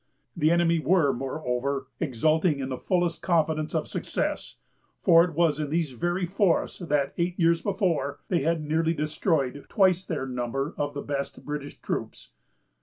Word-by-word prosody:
The 155 -3 +3
enemy 170 0 +3
were, 160 -4 +3
moreover, 135 +1 -2
exulting 155 +2 +2
in 135 -1 -3
the 130 - -3
fullest 175 -2 0
confidence 160 -3 +1
of - - 0
success; - - -3 0.5
for 170 -3 +7
it 170 -3 -3
was 160 -3 +2
in 150 -2 -2
these 160 -2 0
very 175 +8 -1
forests 185 0 +1
that, 150 -6 0
eight 175 +1 -1
years 170 -1 +3
before, 175 -9 -1
they 175 -5 +1
had 160 +1 0
nearly 160 +2 +1
destroyed 150 -2 0
twice 185 -3 +3
their 155 -7 -3
number 130 +4 -3
of 145 0 -3
the 140 - -4
best 140 -1 -4
British 145 -1 -5
troops. - - -5
155 Hz, 160 wpm, -26 LUFS, 140-170 Hz, 0.5 s, for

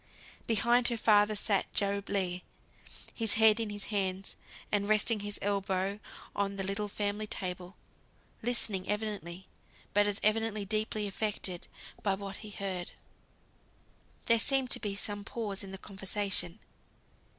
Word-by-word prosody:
Behind 240 +2 +4
her 235 - +2
father 210 -1 +5
sat 205 -1 +1
Job 200 0 +1
Legh, 185 -3 0 0.7
his 225 -3 +2
head 220 0 +6
in 225 -2 -1
his 205 -1 -4
hands, 190 -1 0 0.4
and 205 0 +1
resting 215 +1 +4
his 205 0 -2
elbows 195 0 0 0.4
on 200 0 0
the 195 - -2
little 200 +2 -1
family 205 +1 -2
table, 180 -2 -5 0.7
listening 220 -5 0
evidently; 205 -4 -3 0.5
but 205 0 +5
as 205 -1 -1
evidently 215 -1 +2
deeply 215 +1 -1
affected 195 -3 -2 0.3
by 195 -2 +2
what 195 0 -6
he 215 - -8
heard. 190 -3 -4 1.3
There 230 -1 +5
seemed 265 +1 +2
to - - +5
be 205 -3 -2
some 205 0 -3
pause 210 -2 -4
in 195 - -7
the 195 - -5
conversation. 195 -2 0
205 Hz, 140 wpm, -32 LUFS, 195-215 Hz, 1.3 s, head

